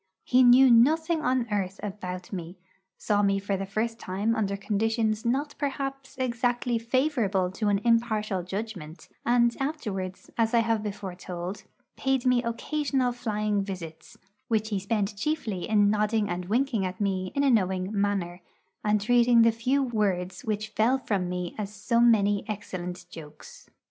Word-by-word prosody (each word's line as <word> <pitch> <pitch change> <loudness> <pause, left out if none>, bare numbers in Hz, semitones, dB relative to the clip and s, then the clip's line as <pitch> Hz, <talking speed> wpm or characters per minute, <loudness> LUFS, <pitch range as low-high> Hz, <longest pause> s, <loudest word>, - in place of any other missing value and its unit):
He 255 +1 +4
knew 255 +1 +7
nothing 315 +7 +4
on 255 -3 +1
earth 195 -2 -2
about 185 -2 -6
me; 175 0 -6 0.4
saw 205 -1 +1
me 195 -1 +2
for 195 0 -2
the 195 0 -4
first 225 +3 -2
time 200 +5 -1
under 200 -3 -1
conditions 220 +2 0
not 280 +5 0
perhaps 275 -1 -4
exactly 245 -1 0
favourable 230 -7 0
to 210 +3 -2
an 200 -1 +2
impartial 220 -4 +1
judgment; 185 -4 -7 0.2
and 235 0 +3
afterwards, 210 -11 -4
as 225 +1 +2
I 230 - +5
have 225 -1 0
before 200 -3 -5
told, 180 +1 -6 0.3
paid 265 -2 0
me 250 -1 +4
occasional 260 +2 -1
flying 215 -4 -1
visits, 180 -5 -8 0.3
which 220 -1 0
he 205 -3 -1
spent 205 0 -1
chiefly 220 - -2
in 205 -2 +4
nodding 210 0 +1
and 175 0 -3
winking 230 +1 0
at 185 0 -4
me 190 -2 -1
in 280 - +2
a 275 - +4
knowing 190 -3 +1
manner, 195 -4 -1 0.4
and 210 0 +2
treating 235 +2 +4
the 230 - +5
few 255 +5 0
words 195 -7 -1
which 215 0 -2
fell 225 +5 +2
from 195 -8 -2
me 180 -1 -3
as 205 -1 -4
so 215 +3 0
many 205 -4 +4
excellent 185 -4 -5
jokes. 155 -2 -12
215 Hz, 160 wpm, -27 LUFS, 195-240 Hz, 0.4 s, knew